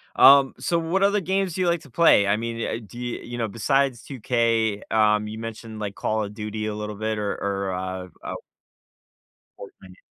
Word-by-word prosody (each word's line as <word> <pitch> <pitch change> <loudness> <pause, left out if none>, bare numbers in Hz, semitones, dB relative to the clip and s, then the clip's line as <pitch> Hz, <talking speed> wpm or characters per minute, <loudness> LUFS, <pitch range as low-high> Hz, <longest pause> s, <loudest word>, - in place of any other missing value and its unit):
Um, 140 -1 +7
so, 170 - 0
what 170 +4 0
other 200 0 +3
games 190 -1 0
do 185 - -2
you 180 - +2
like 170 -1 +1
to 145 - -15
play? 120 -8 +5
I 100 - +3
mean, 115 +1 -3
uh, - - -3
do 120 +4 -11
you 120 -1 -4
you 120 0 -7
know, 115 -2 -1
besides 130 +3 0
2K, 115 -4 0
um, 105 -1 +3
you 110 +1 -7
mentioned, 115 -1 -7
like, 100 -2 -4
Call 110 0 -1
of 100 0 -6
Duty 105 0 -4
a 105 -1 -3
little 105 0 -5
bit 110 +1 -2
or 105 -1 -1
or, 100 -1 -2
uh 95 0 -4 0.2
uh - - -5 1.2
Fortnite. 485 +1 -13
115 Hz, 200 wpm, -24 LUFS, 105-140 Hz, 1.2 s, Um